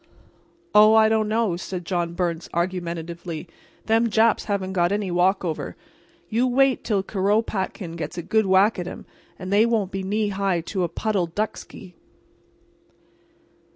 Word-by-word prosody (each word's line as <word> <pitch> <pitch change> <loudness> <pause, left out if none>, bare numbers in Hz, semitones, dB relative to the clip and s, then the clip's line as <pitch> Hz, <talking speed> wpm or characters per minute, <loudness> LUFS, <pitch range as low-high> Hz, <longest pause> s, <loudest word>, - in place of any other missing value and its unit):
"Oh, 215 +1 +7
I 220 0 +6
don't 220 -1 +1
know," 215 -4 +1
said 180 -1 -6
John 170 -1 -2
Byrnes, 170 -2 -2
argumentatively, 170 -1 -3 0.4
"them 225 +1 +2
Japs 225 +1 +3
haven't 190 -2 -2
got 175 -1 +2
any 200 -2 -1
walkover. 180 -2 0 0.5
You 235 +3 +1
wait 265 0 +2
till 205 -4 0
Kuropatkin 195 -3 -1
gets 165 - -5
a 175 - -4
good 220 +3 +1
whack 190 +2 +4
at 175 - -4
'em - - -8 0.3
and 185 +1 -5
they 210 +2 +5
won't 225 -5 0
be 195 - -3
knee 205 +2 -1
high 195 -3 0
to 185 +3 -4
a 175 - 0
puddle 195 0 -1
ducksky." 185 0 -5
195 Hz, 150 wpm, -23 LUFS, 175-215 Hz, 0.5 s, Oh